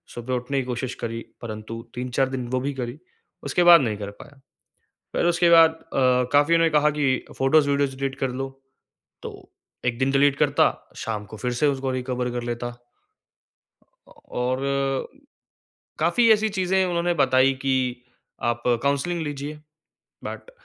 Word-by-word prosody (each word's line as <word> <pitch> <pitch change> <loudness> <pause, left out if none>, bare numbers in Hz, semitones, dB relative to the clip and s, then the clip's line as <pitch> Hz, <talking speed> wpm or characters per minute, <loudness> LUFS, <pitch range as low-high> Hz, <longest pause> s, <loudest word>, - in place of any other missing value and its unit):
सुबह 120 +2 -4
उठने 125 +3 -2
की 130 - -3
कोशिश 125 0 -4
करी, 115 0 -3 0.2
परंतु 110 0 -6
3-4 125 +2 -1
दिन 130 -2 -4
वो 130 - 0
भी 140 +1 -2
करी, 120 +3 -5 0.5
उसके 180 - +1
बाद 170 -3 +9
नहीं 110 -4 -1
कर 100 -1 -6
पाया। 145 -2 -16 0.8
फिर - - +1
उसके 175 0 +3
बाद 165 -1 +7 0.2
अ, 125 -1 +3
काफ़ीओं 145 +4 +4
ने 165 0 +4
कहा 150 -1 +3
कि 130 -3 +1
फ़ोटोज़, 145 +2 +3
वीडियोज़ 140 -1 +1
डिलीट 135 0 -2
कर 135 - 0
लो, 135 +1 -4 0.7
तो - - -10 0.4
एक 120 -1 0
दिन 130 +1 +1
डिलीट 140 0 +3
करता, 145 -1 +3 0.3
शाम 105 -2 -4
को 110 +2 -10
फिर 125 +3 -3
से - - +6
उसको 135 -1 -1
रिकवर 125 -1 -2
कर 120 0 -3
लेता। 120 0 -6 1.3
अ, - - -20
और 135 +2 -2 0.9
काफ़ी 240 -2 +3
ऐसी 220 0 +3
चीज़ें 190 +1 +2
उन्होंने 175 -1 0
बताई 130 +1 +4
कि 135 -1 +1 0.8
आप 120 0 -3 0.2
काउंसलिंग 140 +5 0
लीजिए। 145 0 -5 0.7
बट - - -7
135 Hz, 155 wpm, -24 LUFS, 125-150 Hz, 1.3 s, बाद